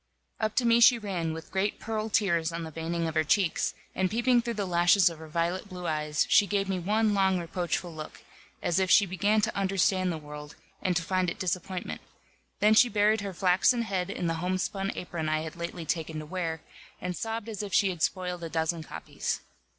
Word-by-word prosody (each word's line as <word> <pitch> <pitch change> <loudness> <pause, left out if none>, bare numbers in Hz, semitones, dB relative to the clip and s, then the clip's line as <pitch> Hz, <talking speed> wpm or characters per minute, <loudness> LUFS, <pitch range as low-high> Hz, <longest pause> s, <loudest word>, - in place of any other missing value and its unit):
Up 215 -1 -1
to 250 - +2
me 235 0 +5
she 235 +1 +7
ran, 185 -7 -3
with 160 0 -8
great 195 +2 -1
pearl 220 0 -3
tears 170 -6 +1
on 165 0 -4
the 160 - -7
veining 165 +1 -2
of 160 - -3
her 160 0 +2
cheeks, 165 +3 +1 0.2
and 190 -1 0
peeping 240 +3 +3
through 235 0 -4
the 205 -1 -2
lashes 175 +1 +4
of 165 - -10
her 160 - -9
violet 170 +5 -2
blue 180 -1 -7
eyes, 150 -1 0
she 205 -2 +5
gave 200 -1 0
me 190 -1 -1
one 210 +4 +1
long 190 -2 +3
reproachful 175 0 -3
look, 155 -1 -9 0.4
as 175 +2 +1
if 190 -1 +1
she 200 - +6
began 200 +4 +1
to 215 +1 -1
understand 190 -1 +1
the 165 - -3
world, 150 -1 -9 0.3
and 185 -1 0
to 170 - +1
find 185 0 0
it - - -5
disappointment; 185 0 -3 0.6
then 215 +1 +6
she 240 +3 +6
buried 210 0 +2
her 200 -1 -4
flaxen 185 +7 +3
head 190 -4 -2
in 185 - -3
the 165 -1 -1
homespun 185 +2 -1
apron 170 -3 -4
I 155 0 +1
had 160 0 -6
lately 170 0 -5
taken 160 0 -2
to 155 - -5
wear, 165 -1 -3 0.4
and 180 0 -4
sobbed 225 +1 -4
as 215 -3 -4
if 205 -1 -6
she 195 +2 +4
had 175 -3 -8
spoiled 180 0 -1
a 165 - -4
dozen 160 +1 -1
copies. 155 - -4
180 Hz, 215 wpm, -28 LUFS, 165-205 Hz, 0.6 s, she